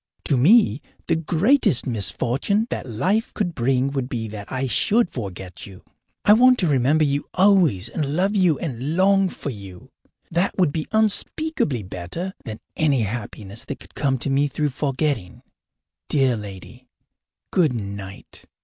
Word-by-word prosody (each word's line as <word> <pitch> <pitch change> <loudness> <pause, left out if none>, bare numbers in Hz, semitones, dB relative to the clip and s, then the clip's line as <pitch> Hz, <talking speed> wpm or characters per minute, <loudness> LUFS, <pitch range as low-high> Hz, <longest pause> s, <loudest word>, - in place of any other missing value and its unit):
To 145 - +2
me, 150 - +4 0.2
the 165 - +1
greatest 175 - +2
misfortune 130 - 0
that 130 - -4
life 185 - 0
could 175 -5 -1
bring 130 +1 +1
would 135 -2 -3
be 115 -3 -3
that 105 -1 -8
I 130 +1 -1
should 205 - +2
forget 95 -6 -7
you. 95 -2 -13 0.4
I 205 - +8
want 255 +3 +6
to 180 - +1
remember 145 +2 +3
you 140 -1 -1
always 180 - +4
and 145 +2 -3
love 195 +4 +1
you 180 -7 +3
and 140 0 -4
long 195 0 +4
for 145 - -6
you. 95 -5 -11 0.4
That 175 +3 0
would 175 -7 +2
be 155 - -3
unspeakably 220 - 0
better 95 - -6
than 110 -3 -7
any 145 -5 +2
happiness 105 -1 -6
that 140 - -6
could - - -17
come 135 -3 0
to 135 +3 -3
me 140 +2 +2
through 145 +2 -1
forgetting. 135 - -2 0.7
Dear 135 -4 +2
lady, 100 -4 -10 0.6
good 160 -8 +3
night. 100 -3 -8
140 Hz, 155 wpm, -22 LUFS, 115-180 Hz, 0.7 s, I